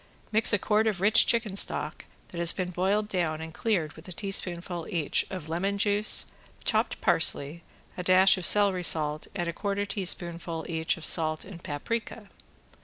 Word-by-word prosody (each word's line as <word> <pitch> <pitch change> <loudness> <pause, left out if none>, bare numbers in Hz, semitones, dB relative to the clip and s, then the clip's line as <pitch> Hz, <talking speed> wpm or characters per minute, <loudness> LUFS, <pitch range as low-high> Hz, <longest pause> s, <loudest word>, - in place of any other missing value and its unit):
Mix 220 +1 +3
a 205 - +3
quart 215 +2 +1
of 205 -5 -1
rich 210 +4 +5
chicken 225 -4 +1
stock - - -1 0.2
that 170 - -8
has 170 0 +4
been 180 -1 -4
boiled 195 +4 0
down 170 -6 -2
and 160 0 -8
cleared 175 -9 -1
with 160 +3 -15
a - - -9
teaspoonful 175 -2 -1
each 165 -8 -1
of 185 -5 -7
lemon 190 +5 -2
juice, 205 +1 +2 0.4
chopped - - -1
parsley, 145 +4 +2 0.3
a - - -5
dash 185 +2 +5
of 185 - -7
celery 200 -1 +4
salt 155 -2 +1
and 175 -3 -3
a 170 - -3
quarter 200 +2 -3
teaspoonful 170 -4 -1
each 160 0 -1
of 165 - -6
salt 155 -2 +1
and 180 -3 -12
paprika. 215 +7 -5
180 Hz, 175 wpm, -27 LUFS, 165-200 Hz, 0.4 s, rich